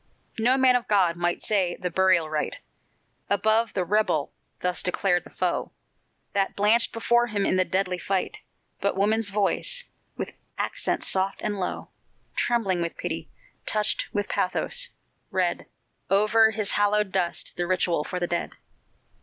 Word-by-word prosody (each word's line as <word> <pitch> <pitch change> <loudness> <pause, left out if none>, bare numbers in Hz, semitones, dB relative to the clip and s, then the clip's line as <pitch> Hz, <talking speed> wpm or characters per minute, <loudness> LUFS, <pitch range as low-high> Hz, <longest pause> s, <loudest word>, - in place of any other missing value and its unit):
No 250 +4 +4
man 260 -1 +5
of 245 - 0
God 185 -5 +3
might 175 0 -1
say 190 -5 +2
the 180 -1 -3
burial 185 -2 +3
rite 155 - -2 0.7
Above 220 +3 +2
the 185 - 0
"rebel" 190 -6 +1 0.3
thus 180 0 -1
declared 180 0 +1
the - - -12
foe - - -2 0.6
That 195 -1 0
blanched 215 +3 +3
before 240 +1 +2
him 205 -3 -1
in - - +2
the 185 0 +3
deadly 185 -1 -1
fight; 195 - -2 0.4
But 200 -1 -1
woman's 215 +2 +2
voice, 210 - +1 0.3
with - - -4 0.3
accents - - -1
soft 190 +1 0
and 205 -2 -2
low, 180 - -4 0.4
Trembling 200 -7 +1
with 170 -1 -3
pity - - -4 0.4
touched 210 -1 +1
with 205 -1 -2
pathos 485 - +1 0.4
read 180 -2 -1 0.4
Over 215 +3 +5
his 215 -2 0
hallowed 205 -1 +2
dust 180 -3 -1
the 175 -1 -2
ritual 175 -4 +1
for 180 - -4
the 175 - 0
dead. 170 0 -2
195 Hz, 150 wpm, -25 LUFS, 180-215 Hz, 0.7 s, man